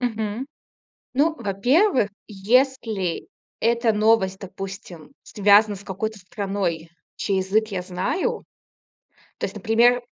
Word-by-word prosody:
Мгм. 225 Hz, +1 st, -2 dB, 0.7 s
Ну, 310 Hz, +4 st, +2 dB
во-первых, 245 Hz, -, +2 dB, 0.2 s
если 220 Hz, -3 st, 0 dB, 0.3 s
эта 235 Hz, 0 st, +2 dB
новость, 210 Hz, -3 st, +2 dB
допустим, 195 Hz, -3 st, -9 dB
связана 205 Hz, 0 st, +4 dB
с 195 Hz, -, -11 dB
какой-то 210 Hz, +2 st, -4 dB
страной, 190 Hz, -5 st, -3 dB, 0.3 s
чей 195 Hz, -2 st, -1 dB
язык 210 Hz, +4 st, +1 dB
я 190 Hz, -3 st, -3 dB
знаю. 185 Hz, -, -2 dB, 1.0 s
То -, -, -3 dB
есть, -, -, -4 dB
например, 240 Hz, +2 st, +3 dB
210 Hz, 105 wpm, -23 LUFS, 195-235 Hz, 1.0 s, связана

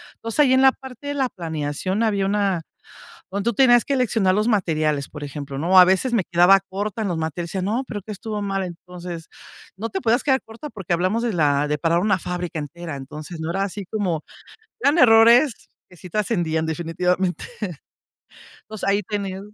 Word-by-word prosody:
Entonces, 230 Hz, +5 st, -5 dB
ahí 265 Hz, -3 st, +5 dB
en 260 Hz, +1 st, +4 dB
la 265 Hz, -, +8 dB
parte 265 Hz, +1 st, -11 dB
de 285 Hz, -, -2 dB
la 265 Hz, -3 st, 0 dB
planeación 165 Hz, +4 st, -3 dB
había 200 Hz, -3 st, +1 dB
una 195 Hz, -4 st, 0 dB, 0.7 s
donde 200 Hz, +2 st, -3 dB
tú -, -, -1 dB
tenías 240 Hz, -1 st, +5 dB
que 280 Hz, -, -1 dB
seleccionar 220 Hz, -7 st, +2 dB
los 215 Hz, +3 st, +1 dB
materiales, 155 Hz, -, 0 dB
por 150 Hz, -1 st, -8 dB
ejemplo, 140 Hz, -1 st, -6 dB
¿no? 170 Hz, +6 st, -2 dB
O, -, -, +7 dB
a 180 Hz, -, +10 dB
veces 190 Hz, +7 st, +2 dB
me 220 Hz, -6 st, +2 dB
quedaba 180 Hz, +3 st, +5 dB
corta 205 Hz, +3 st, -4 dB
en -, -, -1 dB
los 175 Hz, -3 st, -2 dB
materiales, 165 Hz, +2 st, -4 dB
yo 190 Hz, -, -1 dB
decía: 195 Hz, +3 st, -1 dB
"No, 250 Hz, +4 st, 0 dB
pero, 205 Hz, -3 st, -5 dB
¿qué 215 Hz, -, -9 dB
estuvo 210 Hz, +1 st, -5 dB
mal?". 195 Hz, -1 st, -1 dB
Entonces, 175 Hz, -1 st, -8 dB, 0.5 s
no 225 Hz, +3 st, -3 dB
te 385 Hz, -, -4 dB
podías 235 Hz, +1 st, +2 dB
quedar 265 Hz, -2 st, +2 dB
corta 230 Hz, +7 st, -9 dB
porque 190 Hz, -7 st, -8 dB
hablamos 185 Hz, +7 st, 0 dB
de 235 Hz, -, 0 dB
la 145 Hz, -3 st, +2 dB
de 150 Hz, -, 0 dB
parar 165 Hz, +2 st, +1 dB
una 190 Hz, -1 st, +1 dB
fábrica 180 Hz, -2 st, -4 dB
entera. 165 Hz, +1 st, -7 dB
Entonces, 155 Hz, +5 st, -8 dB
no 160 Hz, +1 st, -3 dB
era 195 Hz, +2 st, 0 dB
así 200 Hz, 0 st, -5 dB
como 180 Hz, -6 st, -2 dB, 0.6 s
eran 300 Hz, 0 st, +3 dB
errores 235 Hz, +1 st, +5 dB, 0.2 s
que 180 Hz, -, -17 dB
sí 180 Hz, -, -11 dB
trascendían, 170 Hz, -7 st, 0 dB
definitivamente. 175 Hz, +3 st, -1 dB, 1.2 s
Entonces, 215 Hz, -2 st, -5 dB
ahí 200 Hz, +1 st, +2 dB
tenía 195 Hz, -2 st, -4 dB
190 Hz, 200 wpm, -22 LUFS, 170-225 Hz, 1.2 s, a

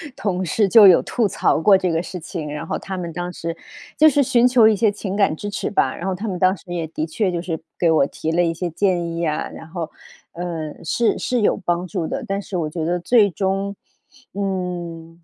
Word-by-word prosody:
同 185 Hz, -2 st, -2 dB
事 200 Hz, +4 st, +1 dB
就 210 Hz, 0 st, +8 dB
有 180 Hz, -, +7 dB
吐 235 Hz, -4 st, 0 dB
槽 -, -, +1 dB
过 195 Hz, +3 st, +6 dB
这 185 Hz, -1 st, -1 dB
个 165 Hz, +1 st, 0 dB
事 180 Hz, 0 st, -7 dB
情。 160 Hz, -2 st, -6 dB
然 150 Hz, +2 st, -5 dB
后 -, -, -2 dB
他 190 Hz, -1 st, -6 dB
们 170 Hz, -2 st, -4 dB
当 175 Hz, +2 st, -4 dB
时 165 Hz, -1 st, -5 dB, 0.4 s
就 310 Hz, +1 st, +7 dB
是 290 Hz, 0 st, +2 dB
寻 245 Hz, -2 st, +3 dB
求 245 Hz, -3 st, +6 dB
一 220 Hz, -, +4 dB
些 205 Hz, +1 st, +2 dB
情 200 Hz, -1 st, -5 dB
感 200 Hz, -5 st, +3 dB
支 205 Hz, +5 st, -5 dB
持 200 Hz, -, -3 dB
吧， 135 Hz, -10 st, +1 dB
然 175 Hz, -, -7 dB
后 190 Hz, -, 0 dB
他 200 Hz, +5 st, -5 dB
们 185 Hz, -3 st, -3 dB
当 185 Hz, +2 st, +3 dB
时 -, -, -17 dB
也 165 Hz, -2 st, -2 dB
的 155 Hz, 0 st, -3 dB
确 185 Hz, +4 st, -1 dB
就 170 Hz, -1 st, -2 dB
是 165 Hz, -3 st, -4 dB, 0.2 s
给 170 Hz, -, +3 dB
我 155 Hz, -4 st, +4 dB
提 160 Hz, -, -4 dB
了 175 Hz, +1 st, +2 dB
一 165 Hz, -, 0 dB
些 175 Hz, +1 st, -3 dB
建 175 Hz, 0 st, 0 dB
议 170 Hz, 0 st, -1 dB
啊， 150 Hz, -1 st, -2 dB
然 160 Hz, -, -10 dB
后， 165 Hz, -2 st, -5 dB, 0.4 s
呃， 165 Hz, -3 st, -5 dB
是 225 Hz, +8 st, +1 dB
是 245 Hz, -3 st, -1 dB
有 -, -, +3 dB
帮 175 Hz, -2 st, -2 dB
助 175 Hz, -3 st, -3 dB
的。 -, -, -4 dB
但 195 Hz, +1 st, -2 dB
是 195 Hz, -, -5 dB
我 160 Hz, -3 st, -1 dB
觉 160 Hz, +1 st, -4 dB
得 175 Hz, +2 st, 0 dB
最 205 Hz, +3 st, +4 dB
终， 195 Hz, +3 st, -2 dB, 0.6 s
嗯， 175 Hz, -4 st, -4 dB
180 Hz, 255 characters per minute, -21 LUFS, 165-200 Hz, 0.6 s, 就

